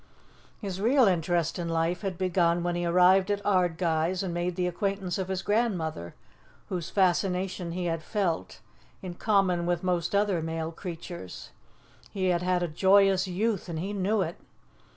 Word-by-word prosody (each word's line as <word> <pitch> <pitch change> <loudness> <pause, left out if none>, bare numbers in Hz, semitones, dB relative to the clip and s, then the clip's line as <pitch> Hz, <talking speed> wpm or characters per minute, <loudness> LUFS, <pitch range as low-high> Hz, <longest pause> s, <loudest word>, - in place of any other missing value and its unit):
His 195 -3 -5
real 255 +5 +4
interest 170 -2 0
in 170 -1 -3
life 165 +2 0
had 190 -3 -3
begun 175 -2 +1
when 175 0 0
he 175 0 -1
arrived 180 +3 +5
at 205 -1 +1
Ardguys 175 -2 +1
and 180 -3 -3
made 175 +1 -2
the 180 -1 0
acquaintance 195 +1 -2
of 190 - -2
his 190 0 -3
grandmother, 180 - -1 0.5
whose 175 -4 -3
fascination 185 -2 0
he 180 0 -3
had 165 -1 -1
felt, 170 - -2 0.4
in 180 -2 -5
common 185 -3 +1
with 175 0 0
most 180 0 0
other 200 -4 +2
male 160 0 -3
creatures. 170 - -8 0.6
He 185 -2 -1
had 175 -1 +1
had 180 0 +1
a - - 0
joyous 190 +3 +4
youth, 195 +1 -1
and 165 - -4
he 190 +6 -3
knew 200 +1 +1
it. 170 0 -5
180 Hz, 165 wpm, -28 LUFS, 170-195 Hz, 0.6 s, arrived